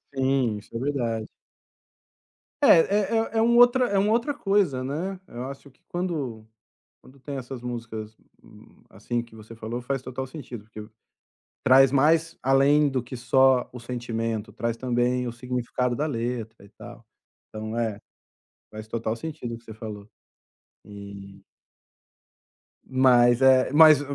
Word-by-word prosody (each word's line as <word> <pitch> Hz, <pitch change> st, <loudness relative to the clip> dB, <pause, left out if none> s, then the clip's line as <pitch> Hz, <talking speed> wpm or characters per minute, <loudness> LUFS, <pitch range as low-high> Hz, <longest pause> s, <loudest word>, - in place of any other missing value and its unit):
Sim, 130 Hz, -5 st, +1 dB
isso 105 Hz, -, -13 dB
é 115 Hz, -, -2 dB
verdade. 120 Hz, -5 st, -2 dB, 1.4 s
É -, -, +6 dB
é 205 Hz, +6 st, +4 dB, 0.2 s
é -, -, -1 dB
é -, -, +4 dB
um 235 Hz, +1 st, +4 dB
outra 245 Hz, +1 st, +6 dB
é 200 Hz, -, +1 dB
uma 205 Hz, +2 st, +2 dB
outra 245 Hz, +5 st, 0 dB
coisa, 195 Hz, -, +1 dB
né. 175 Hz, +8 st, -4 dB
Eu 120 Hz, +2 st, -7 dB
acho 140 Hz, 0 st, -9 dB
que -, -, -34 dB
quando 145 Hz, -12 st, -4 dB, 0.6 s
quando 135 Hz, +2 st, -18 dB
tem 140 Hz, 0 st, -6 dB
essas 130 Hz, -1 st, -7 dB
músicas, 115 Hz, -3 st, -6 dB, 0.7 s
assim, 120 Hz, +4 st, -4 dB
que 115 Hz, -1 st, -16 dB
você 110 Hz, +1 st, -12 dB
falou, 115 Hz, +2 st, -5 dB
faz 135 Hz, +1 st, -2 dB
total 130 Hz, +1 st, -5 dB
sentido. 125 Hz, -5 st, -9 dB
Porque 105 Hz, 0 st, -10 dB, 0.8 s
traz 135 Hz, 0 st, +6 dB
mais 160 Hz, +4 st, +2 dB
além 140 Hz, +3 st, +4 dB
do 130 Hz, -2 st, -1 dB
que 125 Hz, +1 st, -8 dB
só 130 Hz, +1 st, +3 dB
o 125 Hz, -, -9 dB
sentimento, 115 Hz, -2 st, -4 dB
traz 115 Hz, -1 st, -3 dB
também 125 Hz, 0 st, 0 dB
o 120 Hz, -, -3 dB
significado 125 Hz, 0 st, -2 dB
da 150 Hz, -, -1 dB
letra 115 Hz, -4 st, -4 dB
e 100 Hz, -, -18 dB
tal. -, -, -13 dB, 0.4 s
Então 110 Hz, +1 st, -6 dB
é, 110 Hz, -3 st, -1 dB, 0.7 s
faz 110 Hz, 0 st, -9 dB
total 115 Hz, 0 st, -3 dB
sentido 125 Hz, -3 st, -6 dB
o -, -, -10 dB
que 115 Hz, -, -20 dB
você 110 Hz, -, -10 dB
falou, 105 Hz, -2 st, -8 dB, 0.8 s
e 100 Hz, -1 st, -11 dB, 1.5 s
Mas 125 Hz, -2 st, +4 dB
é 130 Hz, -1 st, +5 dB
mas 155 Hz, -1 st, +7 dB
125 Hz, 150 wpm, -25 LUFS, 115-140 Hz, 1.5 s, mas